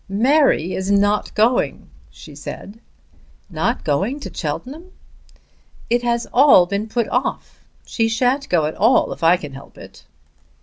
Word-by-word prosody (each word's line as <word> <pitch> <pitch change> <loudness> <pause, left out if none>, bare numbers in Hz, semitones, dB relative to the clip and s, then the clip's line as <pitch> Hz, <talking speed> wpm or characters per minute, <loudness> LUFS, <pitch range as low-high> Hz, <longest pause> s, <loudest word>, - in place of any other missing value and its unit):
"Mary 235 - +2
is 190 +1 -3
not 205 +1 +1
going," 230 +4 +1 0.2
she - - -14
said. 205 +3 -9 0.7
"Not - - -2
going 195 - -1
to - - -8
Cheltenham!" 270 - -6 1.0
"It 240 0 +2
has 235 -1 -1
all 260 -9 +6
been 200 +4 -3
put 230 0 -2
off. 250 +2 -3 0.2
She 225 -1 -1
shan't 255 +5 0
go 165 -4 +2
at 155 - -3
all 225 +6 +2
if - - -12
I 170 +2 +5
can 150 -5 -9
help 135 +1 -13
it." - - -14
220 Hz, 145 wpm, -19 LUFS, 185-250 Hz, 1.0 s, all